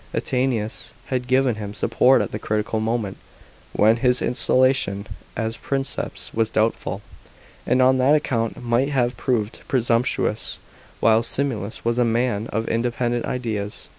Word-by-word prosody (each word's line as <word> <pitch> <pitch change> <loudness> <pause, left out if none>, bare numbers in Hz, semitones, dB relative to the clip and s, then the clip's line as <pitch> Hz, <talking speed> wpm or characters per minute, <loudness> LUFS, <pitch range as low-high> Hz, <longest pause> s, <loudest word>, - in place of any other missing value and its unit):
Attianus 125 -4 -1 0.2
had 125 -1 -1
given 130 -3 +2
him 105 -1 -6
support 130 +4 +4
at - - -6
the 105 - -4
critical 105 +1 -1
moment 110 -3 -2 0.5
when 110 +2 +4
his 125 0 +2
installation 130 -6 +1 0.3
as 110 0 -2
Princeps 135 +3 -4
was 110 -1 +1
doubtful, 110 -2 -1 0.6
and 130 +1 +4
on 130 0 +4
that 135 +4 +5
account 115 -6 -1
might 120 +3 +1
have 125 -3 +1
proved 115 -4 -1
presumptuous; 120 -1 0 0.4
while 110 0 +5
Similis 115 -4 -3
was 120 +1 +1
a - - +5
man 115 -2 0
of 110 0 -2
independent 120 +1 0
ideas. 110 -5 -4
120 Hz, 135 wpm, -23 LUFS, 110-130 Hz, 0.6 s, that